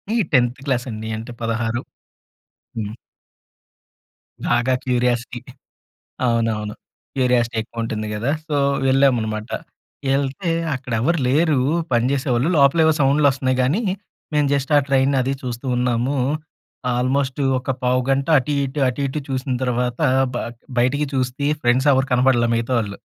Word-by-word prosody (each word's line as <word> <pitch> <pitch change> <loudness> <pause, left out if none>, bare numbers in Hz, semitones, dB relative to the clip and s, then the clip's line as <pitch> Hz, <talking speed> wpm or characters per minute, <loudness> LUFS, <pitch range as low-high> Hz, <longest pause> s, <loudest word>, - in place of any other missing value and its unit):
ఈ - - +2
10థ్ 125 -2 +2
క్లాస్ 125 -2 0
అండి 110 0 -6
అంటే 115 +2 -7
16. 115 +1 -1 1.0
హ్మ్. 105 0 -4 1.5
బాగా 120 +2 +2
క్యూరియాసిటీ. 125 -1 0 0.9
అవునవును. 115 -3 0 0.4
క్యూరియాసిటీ 125 -3 +2
ఎక్కువ 115 0 -6
ఉంటుంది 110 -1 -3
కదా! 115 +7 -1 0.2
సో, 145 - 0 0.3
వెళ్ళామనమాట 120 -5 +2 0.6
వెళ్తే, 140 +6 0 0.2
అక్కడ 125 -1 -6
ఎవరు 165 +6 +1
లేరు 150 +1 +3 0.3
పనిచేసేవాళ్ళు 130 +2 +1
లోపల 140 +3 +4
ఏవో 160 - +5
సౌండ్లు 140 +2 +4
వస్తున్నాయి 130 -1 -1
గానీ 150 - +1 0.5
మేము 150 -1 +2
జస్ట్ 140 +1 0
ఆ - - +8
ట్రైనది 135 -1 +2
చూస్తూ 125 +1 -5
ఉన్నాము. 125 +3 0 0.8
ఆల్మోస్ట్ 130 +2 0 0.2
ఒక 130 +1 -4
పావుగంట 130 +2 +1
అటు 135 +3 -2
ఇటు, 140 +2 -4
అటు 125 +3 -3
ఇటు 145 +3 -3
చూసిన 130 0 -2
తర్వాత 125 +1 -1 0.3
బ - - -2 0.4
బయటికి 145 +5 +2
చూ‌స్తి 130 +2 -1 0.2
ఫ్రెండ్స్ 125 +4 +3
ఎవరు 130 0 +2
కనపడలే 125 -2 +3
మిగతావాళ్ళు. 115 -3 -1
130 Hz, 125 wpm, -21 LUFS, 120-135 Hz, 1.5 s, ఆ